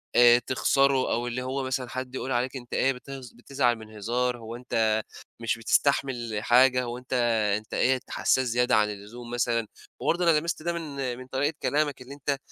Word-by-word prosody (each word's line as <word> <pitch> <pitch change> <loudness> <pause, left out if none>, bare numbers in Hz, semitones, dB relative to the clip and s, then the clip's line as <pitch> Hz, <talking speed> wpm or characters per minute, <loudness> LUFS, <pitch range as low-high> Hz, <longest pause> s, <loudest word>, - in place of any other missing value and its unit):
آآ 120 0 +7
تخسره 135 +1 +2
أو 120 +1 0
اللي 120 +1 -3
هو 135 +1 -2
مثلًا 130 -1 -2
حد 130 0 -5
يقول 130 - -4
عليك 125 +2 0
أنت 120 -2 -8
إيه 135 - +3
بتهز 130 -1 -9
بتزعل 120 0 0
من 110 -1 -12
هزار، 120 +4 -1
هو 115 0 -8
أنت 110 -3 0 0.4
مش 115 -1 0
بتستحمل 120 -1 +1
حاجة، 125 +1 +5
هو 120 0 -4
أنت 125 +1 -8 0.4
أنت 110 0 -11
إيه 130 0 +2
حسّاس 130 -1 +1
زيادة 125 +1 +2
عن 105 -1 +3
اللزوم 110 +4 -9
مثلًا 115 -2 0 0.3
وبرضه 175 +1 +1
أنا 155 - +4
لَمست 165 0 -4
ده 170 +1 -1
من 140 -7 -4
من 130 0 -10
طريقة 140 +4 0
كلامك 145 -2 0
اللي 130 +2 -9
أنت 140 0 -2
125 Hz, 185 wpm, -27 LUFS, 120-135 Hz, 0.4 s, آآ